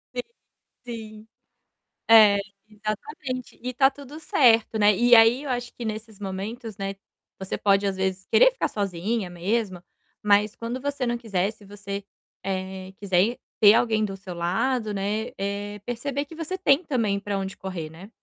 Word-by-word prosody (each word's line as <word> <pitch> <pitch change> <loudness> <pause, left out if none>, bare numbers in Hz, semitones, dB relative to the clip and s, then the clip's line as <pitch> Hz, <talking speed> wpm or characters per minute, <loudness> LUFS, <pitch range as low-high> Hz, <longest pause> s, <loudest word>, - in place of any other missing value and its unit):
Sim 245 - 0 0.6
sim. 220 -2 -8 0.8
É, 215 -3 +8 0.3
exatamente, 250 - -5
e 250 - -3
está 270 +2 +4
tudo 285 +2 -11
certo, 230 -7 +3
né, 205 -1 +5
e 240 +2 +4
aí 230 +4 +7
eu 280 - -6
acho 245 -1 -3
que, 240 - -8
nesses 215 -1 -6
momentos, 205 +3 -5
né, 195 0 -4 0.4
você 190 0 -4
pode, 200 0 +3
às 195 -1 -1
vezes, 190 0 -2
querer - - +7
ficar - - -1
sozinha 200 +1 -2
mesma, 185 +1 -2 0.4
mas 210 0 +3
quando 235 +3 -4
você 280 -1 -2
não 240 0 0
quiser, 200 -4 -1
se 210 -2 -18
você, 200 0 -7 0.4
eh, 190 0 -4
quiser 200 +4 +1 0.2
ter 210 0 +8
alguém 220 -2 +2
do 195 -1 -5
seu 190 -2 -8
lado, 210 +6 0
né, 210 +4 -2
eh, 205 +1 -4
perceber 275 +4 -3
que 310 - -13
você 335 +3 -4
tem 300 -4 +4
também 225 -9 0
para 200 0 -3
onde 195 0 -4
correr, 180 -5 -5
né. 175 +6 -12
215 Hz, 165 wpm, -25 LUFS, 195-240 Hz, 0.8 s, É